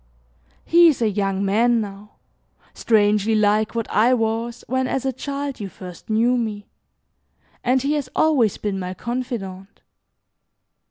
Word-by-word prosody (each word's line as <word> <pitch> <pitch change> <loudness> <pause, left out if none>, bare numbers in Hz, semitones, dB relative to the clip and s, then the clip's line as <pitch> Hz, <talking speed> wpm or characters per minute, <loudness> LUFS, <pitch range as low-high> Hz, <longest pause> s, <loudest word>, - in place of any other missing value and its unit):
He 340 +1 +6
is 310 - +2
a 225 -3 +1
young 195 -1 -1
man 230 +4 +3
now, 205 0 -7 0.6
strangely 210 -1 +2
like 215 +1 +2
what 230 -1 -2
I 235 +5 +4
was, 225 +1 -2
when 260 +1 -1
as 265 0 -2
a 265 - 0
child, 280 +1 -5
you 200 -2 -5
first 180 0 -12
knew 235 +3 +2
me, 215 -3 -3 1.0
and 255 +1 +2
he 285 +2 +1
has 290 -4 -2
always 270 -10 +2
been 200 -2 -3
my 185 0 -5
confidant. 210 -6 -6
225 Hz, 145 wpm, -22 LUFS, 205-255 Hz, 1.0 s, He